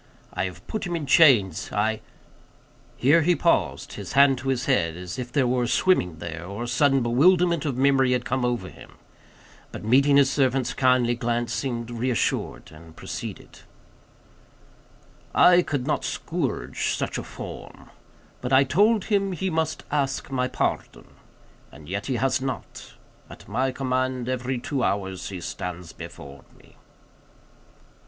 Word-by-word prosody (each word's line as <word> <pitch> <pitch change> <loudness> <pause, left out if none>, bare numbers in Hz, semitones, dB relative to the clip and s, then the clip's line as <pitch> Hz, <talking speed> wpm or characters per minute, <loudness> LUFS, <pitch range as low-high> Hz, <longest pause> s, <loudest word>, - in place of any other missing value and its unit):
I 90 - -1
have 90 -1 -8
put 215 -4 -4
him 175 - -2
in 160 -3 -3
chains; 130 - +4
I—" 110 +1 0 1.0
Here 150 +7 +4
he 175 +3 +3
paused; 170 - 0
his - - -7
hand 140 -2 +5
to 130 - -7
his 130 -1 0
head, 85 -12 +1
as 90 +5 -7
if 125 -1 -5
there 135 0 +2
were 125 0 +1
a - - -2
swimming 115 - +2
there, 85 +1 -6
or 100 +6 -6
a - - -4
sudden 135 +1 +2
bewilderment 170 +7 +3
of 135 -4 -2
memory 135 -1 +3
had 125 -1 -1
come 130 -1 -1
over 120 -6 -1
him; - - -14 0.8
but - - -8
meeting 140 +5 +4
his 140 -1 +4
servant's 130 -2 +1
kindly 125 -2 +3
glance 120 0 -2
seemed 120 -3 -3
reassured, 120 0 -2
and 80 +1 -15
proceeded:— - - -8 1.8
"I 180 0 +7
could 145 -7 -3
not 150 - -1
scourge 165 -8 -2
such - - -3
a - - -6
form. - - -10 0.5
But 125 - -4
I 135 +1 +6
told 205 - +3
him 195 -3 0
he 190 +1 -2
must 160 -1 -1
ask 140 -1 -1
my 125 -1 0
pardon. - - -3 0.6
As 75 +3 -14
yet 100 +9 -5
he 130 - -1
has 130 +3 +1
not. 135 0 -6 0.3
At - - -13
my 130 +1 0
command, 130 -1 -2
every 130 0 -2
two 135 +2 -3
hours 95 -4 -2
he 95 -2 -6
stands 90 -1 -6
before 70 0 -11
me." - - -22
130 Hz, 155 wpm, -24 LUFS, 115-140 Hz, 1.8 s, I